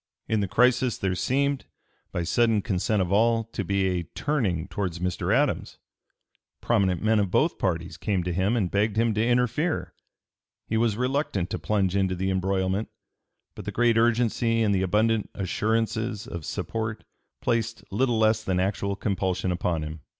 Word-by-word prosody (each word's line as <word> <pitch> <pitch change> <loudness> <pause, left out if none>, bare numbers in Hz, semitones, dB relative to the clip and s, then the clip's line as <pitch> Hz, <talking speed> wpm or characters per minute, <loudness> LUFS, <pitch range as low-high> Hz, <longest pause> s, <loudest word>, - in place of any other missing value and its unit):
In 110 - +1
the 100 - 0
crisis 125 +2 +3
there 95 -1 -1
seemed, 140 +7 0 0.5
by 85 - -2
sudden 110 +3 +2
consent 100 -1 +1
of 90 - -4
all, 115 +3 +3
to 100 - -2
be 100 +1 0
a 90 -2 0
turning 100 - 0
towards 90 -2 -3
Mr. 90 0 -2
Adams. - - +1 0.8
Prominent 95 -6 +1
men 110 0 +3
of 100 -2 +1
both 155 - +1
parties 85 -2 -2
came 95 +1 -1
to 90 0 -2
him 95 +7 +1
and 95 -6 0
begged 105 +1 +1
him 115 0 +2
to 110 +1 +1
interfere. 125 +7 0 0.7
He 110 - -2
was 110 -2 +2
reluctant 125 - -1
to - - -2
plunge 100 -3 0
into 95 -2 +1
the 95 +2 -1
embroilment; 95 +2 0 0.6
but 105 - -9
the 105 - -3
great 120 +2 +3
urgency 115 0 +2
and 105 -2 +2
the 95 - +1
abundant 105 +3 +1
assurances 110 +2 -1
of 85 -3 -7
support 110 -1 -3 0.4
placed 115 -4 -1
little 120 +3 +1
less 110 0 +3
than 95 -3 0
actual 100 +1 -1
compulsion 95 -3 -1
upon 85 -2 -1
him. 75 0 -7
105 Hz, 165 wpm, -26 LUFS, 95-115 Hz, 0.8 s, crisis